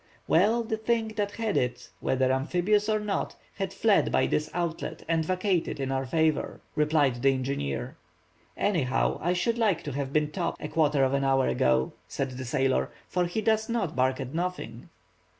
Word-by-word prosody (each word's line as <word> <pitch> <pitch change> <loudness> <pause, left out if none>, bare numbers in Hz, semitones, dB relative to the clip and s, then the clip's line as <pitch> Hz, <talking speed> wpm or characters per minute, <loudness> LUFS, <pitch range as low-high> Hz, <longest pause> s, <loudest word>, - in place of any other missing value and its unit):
"Well, 215 +8 +3
the 220 -1 -2
thing 225 0 0
that 205 -2 -2
had 225 -2 -2
it, 125 -1 -1
whether 130 0 +1
amphibious 180 +10 +1
or 215 0 +2
not, 210 -1 -2 0.2
has 195 -1 -3
fled 215 -3 +3
by - - +3
this 150 0 0
outlet 165 -2 -3
and 165 0 +1
vacated 185 -2 0
in 135 -1 -2
our 135 0 -1
favor," 160 +1 +1 0.2
replied 150 -5 +2
the 135 - +5
engineer. 130 - -3 0.6
"Any 200 -6 +1
how, 125 -1 0
I 175 +2 +1
should 225 +7 0
like 210 -7 +2
to 145 - -4
have 140 0 -3
been 150 0 +1
Top 170 +1 -2
a 150 - -5
quarter 150 -4 +2
of 130 0 +2
an 140 0 +1
hour 135 -1 +3
ago," 65 0 +2
said 135 -1 -3
the 130 0 -6
sailor, 130 +1 +1 0.2
"for 180 -1 0
he 175 +6 -2
does 220 0 +1
not 225 -9 -1
bark 130 +1 +1
at 130 +1 -5
nothing." 165 -10 -4
160 Hz, 185 wpm, -28 LUFS, 135-200 Hz, 0.6 s, the